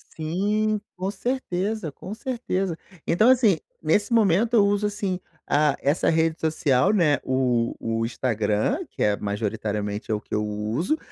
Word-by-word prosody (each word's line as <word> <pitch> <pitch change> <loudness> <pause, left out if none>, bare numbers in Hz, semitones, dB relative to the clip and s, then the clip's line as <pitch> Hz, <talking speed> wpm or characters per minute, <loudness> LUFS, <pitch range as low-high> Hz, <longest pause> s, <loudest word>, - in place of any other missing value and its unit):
Sim, 205 +7 0 0.2
com 190 +1 -3
certeza, 210 - -2
com 190 +7 -8
certeza. 215 - -2 0.3
Então, 215 +8 +4
assim, 235 -8 +5 0.2
nesse 205 +9 +1
momento 220 +1 +3
eu 205 -2 +6
uso, 205 +1 +1
assim, 200 -3 -2 0.3
a 145 -1 +3
essa 145 +5 +2
rede 160 0 +1
social, 155 0 +2
né, 160 -7 +3
o 125 -3 +1
o 115 0 -1
Instagram, 110 - 0
que - - -3
é 105 -1 +3
majoritariamente 105 0 -3
é - - +3
o 105 - -2
que - - -12
eu 105 0 +1
uso, 110 - -1
165 Hz, 150 wpm, -24 LUFS, -, 0.3 s, eu